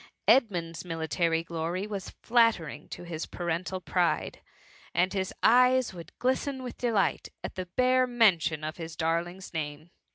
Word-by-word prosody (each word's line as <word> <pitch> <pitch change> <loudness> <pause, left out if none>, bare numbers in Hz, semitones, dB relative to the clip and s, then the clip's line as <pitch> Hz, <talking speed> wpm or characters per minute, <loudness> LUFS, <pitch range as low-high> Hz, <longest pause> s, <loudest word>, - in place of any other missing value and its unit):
Edmund^s 175 - +3
military 165 0 0
glory 170 +3 -3
was 205 -3 -5
flattering 225 -11 +1
to - - -7
his 170 -2 -5
parental 175 +2 -3
pride, 180 -1 0 0.5
and 185 +2 +2
his 190 -1 -1
eyes 250 0 +5
would 170 -2 -10
glisten 260 +1 -1
with 250 - -6
delight 225 -5 +1
at - - -5
the 185 -1 -5
bare 255 +6 +3
mention 185 -10 +3
of 155 +1 -4
his 165 -1 -7
darling's 170 +3 -2
name. 155 +1 -5
180 Hz, 140 wpm, -29 LUFS, 165-230 Hz, 0.5 s, eyes